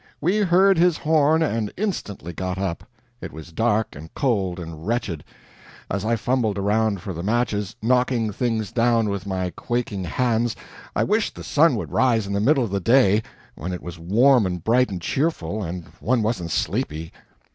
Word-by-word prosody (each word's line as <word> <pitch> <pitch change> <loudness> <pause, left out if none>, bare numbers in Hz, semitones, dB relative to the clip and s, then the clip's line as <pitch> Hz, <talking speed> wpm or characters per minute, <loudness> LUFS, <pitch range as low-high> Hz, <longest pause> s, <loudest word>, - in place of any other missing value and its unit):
We 180 +6 +1
heard 190 -2 +4
his 175 -1 +4
horn 155 0 +3
and 115 -8 -1
instantly 105 - -3
got 95 +2 -3
up. 95 -3 -3 0.4
It - - -6
was 80 +2 -10
dark 110 +3 0
and 80 +3 -10
cold 95 -9 0
and 80 0 -8
wretched. 105 -10 -2 0.7
As 100 +1 -1
I 115 +2 +1
fumbled 115 -2 0
around 105 0 +1
for 95 - -4
the 85 - -5
matches, 105 -1 -1
knocking 125 -2 +2
things 110 -1 -1
down 115 -2 +2
with 100 0 -4
my 95 -2 -2
quaking 115 -6 -2
hands, 120 +5 0 0.4
I - - +2
wished - - 0
the - - -8
sun - - +3
would - - -4
rise 115 -5 +2
in 100 - -4
the 100 - +1
middle 135 +3 +3
of 110 - -4
the 100 - 0
day, 110 0 +4 0.3
when 90 +5 -6
it 90 - -6
was 85 -1 -8
warm 115 +6 +4
and 90 -2 -4
bright 125 +5 +3
and 95 -3 -4
cheerful, 110 - -1
and 90 -2 -5
one 120 0 +1
wasn't 105 -6 -1
sleepy. 80 +1 -2
110 Hz, 180 wpm, -23 LUFS, 95-125 Hz, 0.7 s, heard